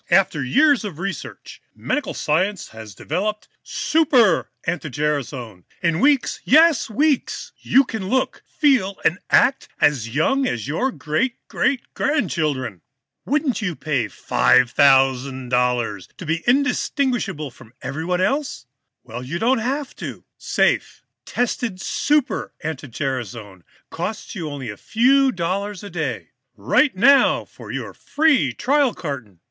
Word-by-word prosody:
"After 175 -6 +3
years 285 - +3
of 195 -8 -6
research, 195 +3 -6
medical 295 - -2
science 185 +6 0
has 110 -3 -11
now - - -11
developed 210 +7 -2
Super 255 - +2
anti 165 -2 -3
gerasone! 130 - -3 0.2
In 165 -1 +1
weeks 280 +1 +2
yes, 315 -2 +5
weeks 285 +4 0
you 270 - +4
can 220 -6 -5
look, 260 +2 0
feel 250 - +1
and 180 - +2
act 270 +1 +3
as 125 -6 +2
young 270 - +1
as 120 +1 -3
your 245 - 0
great 235 +9 -1
great 255 -1 0
grandchildren! 150 - -1 0.4
Wouldn't 285 -4 0
you 180 -6 -2
pay 145 -7 -1
$5,000 125 -4 +2
to 185 - -8
be 165 +1 -1
indistinguishable 245 - 0
from 115 0 -17
everybody 165 +7 -1
else? 275 - -1 0.4
Well, 120 0 -7
you 140 +7 -4
don't 240 +6 +2
have 270 +5 -3
to. - - -7
Safe, - - 0 0.2
tested 240 -5 -2
Super 295 +7 0
anti 150 -2 -4
gerasone 115 -7 -5 0.3
costs - - -5
you 160 -3 -4
only 135 -6 -5
a 105 - -11
few 265 +4 +3
dollars 195 +1 -3
a 200 - -8
day. 160 -6 -4 0.2
"Write 125 - +2
now 275 +8 +5
for - - -11
your - - -5
free 285 - +2
trial 275 - +1
carton. 130 - -6
180 Hz, 130 wpm, -21 LUFS, -, 0.4 s, yes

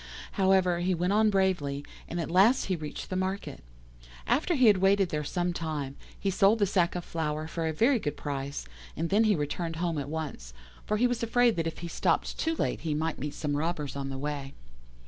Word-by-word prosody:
However, 190 -3 +3
he 180 +1 +1
went 180 +3 0
on 215 +1 +4
bravely, 175 -8 0 0.2
and 170 - -4
as 165 - -2
last 210 +9 +5
he 190 - 0
reached 155 +1 -7
the - - -1
market. 185 - -3 0.6
After 330 +5 +2
he 260 -3 +4
had 210 -3 +7
waited 195 0 +3
there 150 -2 -2
some 175 +4 -1
time, 150 -5 -4 0.2
he 195 - 0
sold 195 +3 +4
the 205 - +3
sack 180 -3 +1
of 175 - -4
flour 155 -1 -2
for 165 0 -2
a - - 0
very 235 - +3
good 145 -6 -3
price, 140 -1 -4 0.3
and 165 +2 -2
then 215 +3 +4
he 210 -2 +4
returned 165 +2 -3
home 165 -2 -1
at 140 - -5
once, 145 - -5 0.3
for 215 - +1
he 240 - +3
was 245 -1 0
afraid 235 0 +3
that 165 -1 0
if 165 - -4
he - - -3
stopped 170 - 0
too 325 0 0
late - - -1
he 155 -2 -1
might 160 +1 -2
meet 145 +2 -4
some 145 -2 -2
robbers 150 -2 -2
on 135 -1 -3
the 135 - -4
way. 140 -1 -4
170 Hz, 220 wpm, -29 LUFS, 150-195 Hz, 0.6 s, had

